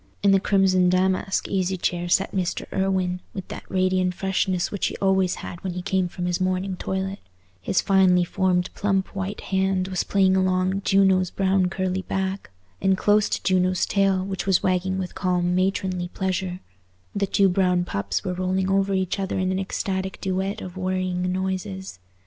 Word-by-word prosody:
In 200 Hz, -, +5 dB
the 195 Hz, -, +5 dB
crimson 190 Hz, -2 st, +3 dB
damask 185 Hz, +1 st, +1 dB
easy 190 Hz, -1 st, 0 dB
chair 175 Hz, 0 st, -2 dB
sat 195 Hz, +2 st, +2 dB
Mr. 185 Hz, -2 st, -2 dB
Irwine, 190 Hz, -2 st, 0 dB, 0.2 s
with 190 Hz, -2 st, -6 dB
that -, -, -8 dB
radiant 185 Hz, -1 st, +1 dB
freshness 190 Hz, -1 st, 0 dB
which 200 Hz, -, -1 dB
he -, -, -5 dB
always 190 Hz, -2 st, +2 dB
had 175 Hz, -, -8 dB
when 185 Hz, -2 st, -3 dB
he 180 Hz, 0 st, -5 dB
came 190 Hz, -1 st, +1 dB
from 175 Hz, 0 st, -5 dB
his 180 Hz, +1 st, -1 dB
morning 185 Hz, +1 st, 0 dB
toilet; 190 Hz, +2 st, -3 dB, 0.4 s
his 185 Hz, -, +1 dB
finely 190 Hz, -2 st, +4 dB
formed 180 Hz, 0 st, 0 dB
plump 195 Hz, -1 st, -1 dB
white 195 Hz, +1 st, -4 dB
hand 190 Hz, -1 st, 0 dB
was 185 Hz, -1 st, -1 dB
playing 190 Hz, -1 st, +3 dB
along 185 Hz, +1 st, +1 dB
Juno's 190 Hz, -2 st, +3 dB
brown 190 Hz, -1 st, +1 dB
curly 185 Hz, 0 st, -2 dB
back; 190 Hz, +1 st, -3 dB, 0.3 s
and 190 Hz, -1 st, +3 dB
close 210 Hz, +1 st, +3 dB
to -, -, -2 dB
Juno's 185 Hz, -1 st, +2 dB
tail, 195 Hz, -2 st, +1 dB
which 195 Hz, 0 st, -4 dB
was 190 Hz, -2 st, +3 dB
wagging 185 Hz, +1 st, 0 dB
with 185 Hz, -2 st, -4 dB
calm 180 Hz, -2 st, 0 dB
matronly 185 Hz, -1 st, 0 dB
pleasure, 185 Hz, 0 st, -3 dB, 0.5 s
the 200 Hz, -1 st, 0 dB
two 195 Hz, 0 st, +3 dB
brown 180 Hz, -1 st, +2 dB
pups 100 Hz, -, -2 dB
were 185 Hz, -2 st, -2 dB
rolling 185 Hz, +1 st, 0 dB
over 195 Hz, 0 st, +2 dB
each 190 Hz, +1 st, -1 dB
other 195 Hz, -1 st, -2 dB
in 185 Hz, 0 st, 0 dB
an 190 Hz, -, -1 dB
ecstatic 190 Hz, 0 st, -3 dB
duet 190 Hz, +2 st, -2 dB
of 180 Hz, -1 st, -8 dB
worrying 185 Hz, -1 st, -1 dB
noises. 190 Hz, -, -4 dB
190 Hz, 175 wpm, -24 LUFS, 185-195 Hz, 0.5 s, In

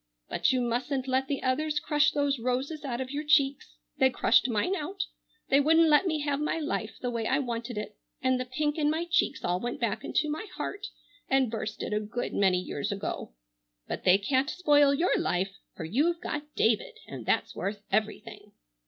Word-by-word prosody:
But -, -, +2 dB
you 255 Hz, -1 st, +1 dB
mustn't 250 Hz, +3 st, -1 dB
let 260 Hz, +1 st, +1 dB
the 280 Hz, -1 st, -2 dB
others 295 Hz, +4 st, +1 dB
crush 295 Hz, -1 st, +3 dB
those 285 Hz, -2 st, 0 dB
roses 260 Hz, +6 st, -2 dB
out 250 Hz, -4 st, -3 dB
of 260 Hz, 0 st, -5 dB
your 290 Hz, +1 st, -3 dB
cheeks. 280 Hz, -, +2 dB, 0.2 s
They 265 Hz, -, +6 dB
crushed 250 Hz, -, +3 dB
mine 235 Hz, -, +1 dB
out. 380 Hz, +4 st, -3 dB, 0.4 s
They 275 Hz, -, +5 dB
wouldn't 320 Hz, +3 st, +5 dB
let 300 Hz, +5 st, +5 dB
me 310 Hz, -3 st, 0 dB
have 290 Hz, -1 st, -1 dB
my 300 Hz, -, 0 dB
life 290 Hz, -8 st, -3 dB
the 245 Hz, -, -2 dB
way 230 Hz, -2 st, -2 dB
I 265 Hz, -, +2 dB
wanted 240 Hz, -3 st, -3 dB
it, 210 Hz, 0 st, -5 dB, 0.2 s
and 260 Hz, -1 st, +1 dB
the 255 Hz, -, -2 dB
pink 295 Hz, +4 st, -1 dB
in 295 Hz, -1 st, +3 dB
my 320 Hz, +3 st, 0 dB
cheeks 335 Hz, -5 st, +1 dB
all 180 Hz, +1 st, 0 dB
went 240 Hz, +3 st, -4 dB
back 230 Hz, -5 st, -1 dB
into 305 Hz, -, 0 dB
my 310 Hz, +8 st, -4 dB
heart 405 Hz, +1 st, -4 dB, 0.4 s
and 265 Hz, -4 st, +3 dB
burst 215 Hz, -1 st, -4 dB
it -, -, -3 dB
a 210 Hz, -, +2 dB
good 215 Hz, +3 st, -4 dB
many 190 Hz, -2 st, +3 dB
years 160 Hz, -4 st, -3 dB
ago. 200 Hz, -, -4 dB, 0.5 s
But -, -, -4 dB
they 185 Hz, +1 st, +6 dB
can't 260 Hz, +7 st, +1 dB
spoil 290 Hz, -5 st, +4 dB
your 330 Hz, +6 st, +2 dB
life, 185 Hz, +2 st, 0 dB, 0.2 s
for 160 Hz, -, -5 dB
you've 300 Hz, -, +1 dB
got 295 Hz, -3 st, -4 dB
David 230 Hz, -, +1 dB
and -, -, -7 dB
that's -, -, +1 dB
worth 200 Hz, +1 st, -4 dB
everything." 215 Hz, 0 st, -2 dB
265 Hz, 200 wpm, -28 LUFS, 230-300 Hz, 0.5 s, They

